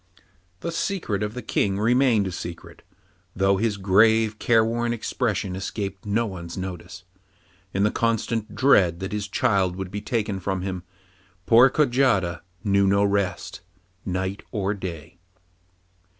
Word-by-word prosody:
The 170 - -3
secret 165 - -2
of 105 +1 -3
the 125 - -6
King 100 -2 0
remained 120 0 +3
a 95 - -3
secret, 85 -1 -8 0.5
though 95 0 +2
his 105 0 0
grave, 110 +3 +3
careworn 115 +1 +2
expression 110 -5 -2
escaped 100 +2 -5
no 110 +3 +1
one's 85 -4 -7
notice. 90 -1 -7 0.7
In 100 - 0
the 105 - +3
constant 115 -1 -1
dread 100 -9 +4
that 95 0 -5
his 105 0 -2
child 95 -3 +1
would 95 -1 -6
be 105 +1 -4
taken 105 -4 -2
from 95 0 -3
him, 95 -2 -4 0.6
poor 120 +3 +7
Kojata 120 - +2 0.2
knew 100 -2 +3
no 100 +1 +3
rest 100 -2 -1 0.4
night 95 +2 -3
or 100 -1 -1
day. 90 -4 -8
100 Hz, 135 wpm, -24 LUFS, 95-115 Hz, 0.7 s, poor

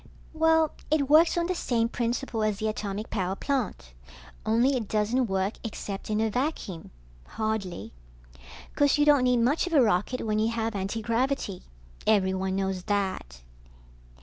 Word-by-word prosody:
Well, 320 -1 +3 0.2
it 290 -2 +1
works 320 +3 +6
on 340 - +1
the 365 - 0
same 235 -9 0
principle 235 0 -2
as 215 -2 0
the 220 - -2
atomic 210 0 -4
power 190 -2 -1
plant, 215 - -3 0.5
only 240 +5 +3
it 230 -5 -2
doesn't 220 +5 +1
work 195 +1 -1
except 205 -3 -6
in 215 0 0
a 220 - +2
vacuum, 245 - -3 0.5
hardly. 200 - -3 0.8
Course 285 +1 +3
you 295 - +3
don't 290 -4 +5
need 250 -1 +3
much 265 +10 +2
of 350 - -4
a 290 - +6
rocket 215 +4 0
when 215 -1 0
you 220 +1 +2
have 225 0 -2
antigravity. 225 +2 -1 0.5
Everyone 190 -2 +2
knows 190 -1 -1
that. 190 - -2
220 Hz, 150 wpm, -27 LUFS, 195-265 Hz, 0.8 s, works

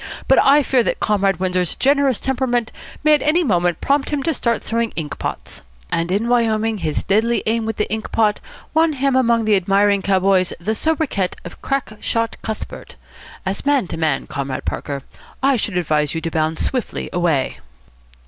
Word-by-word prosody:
But - - +5
I 285 +2 +5
fear 260 -2 +3
that - - -1
Comrade 195 -2 +1
Windsor's 180 -2 0
generous 275 -2 +2
temperament 245 -3 -1 0.3
may 305 0 +5
at 300 - +3
any 330 +4 +2
moment 175 - +1
prompt 280 0 +1
him 290 -2 -1
to 325 - +1
start 235 -4 -1
throwing 230 0 -1
ink 155 -3 -5
pots. - - -5 0.3
And 170 +1 -1
in 205 +5 0
Wyoming 225 -2 +1
his 155 -4 -2
deadly 225 +4 +1
aim 225 0 0
with 225 - -3
the 210 - 0
ink 220 0 -4
pot 215 -2 +2 0.3
won 320 0 +3
him 275 -1 +1
among 235 -3 +3
the 215 -1 +4
admiring 200 +1 +2
cowboys 190 -1 +2
the 210 +6 -1
sobriquet 280 - 0
of - - -10
Crack 275 -5 -2
Shot 230 +1 -1
Cuthbert. 220 - -7 0.5
As 190 +1 -3
man 280 -8 +2
to - - -4
man, 155 -4 0
Comrade 140 -2 -4
Parker, 140 -2 -4 0.4
I 275 0 +4
should 205 -5 -2
advise 150 -3 0
you 165 - -2
to 165 - -3
bound 160 0 0
swiftly 255 -3 -2
away." 170 -6 0
220 Hz, 180 wpm, -20 LUFS, 180-260 Hz, 0.5 s, But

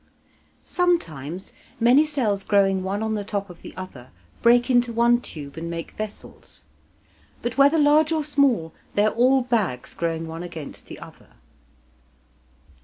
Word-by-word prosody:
Sometimes 185 - -1 0.3
many 250 +6 +5
cells 225 -10 -1
growing 195 -2 +2
one 195 +3 -2
on 220 0 -1
the 210 -1 -2
top 200 -2 -4
of 175 - -15
the - - -11
other 140 -10 -9 0.3
break 240 +1 +5
into 245 -2 +3
one 235 +1 +3
tube 145 -8 -8
and 165 +1 -5
make 165 0 -5
vessels. 215 -1 -9 0.8
But 240 - -2
whether 285 +3 +6
large 300 +1 +4
or 315 -2 +1
small, 275 - +1 0.2
they 205 - +3
are 215 - +1
all 255 +2 +3
bags 215 - -1
growing 165 -1 -2
one 165 +1 -7
against 170 -5 -8
the - - -9
other. - - -14
215 Hz, 150 wpm, -23 LUFS, 170-255 Hz, 0.8 s, whether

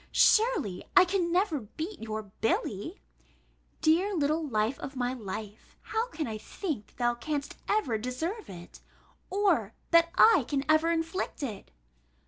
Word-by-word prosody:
Surely 430 - +3
I 370 - +9
can 355 -2 0
never 360 -4 +2
beat 315 - -7
your 220 -1 -4
Billy! 210 - -2 0.8
Dear 360 +6 +3
little 310 +1 +1
life 225 -2 0
of 270 - -7
my 250 0 -1
life! 215 -2 -8
how 450 +2 -1
can 325 -10 -4
I 220 -3 -5
think 270 - -5
thou 240 -1 +1
canst 285 +4 -4
ever 265 - +1
deserve 320 - -4
it, 175 -2 -11 0.5
or 360 - +1 0.2
that 335 0 +6
I 370 - +6
can 280 -1 -1
ever 310 +2 +4
inflict 330 -1 -2
it? 220 -7 -5
295 Hz, 140 wpm, -29 LUFS, 225-355 Hz, 0.8 s, I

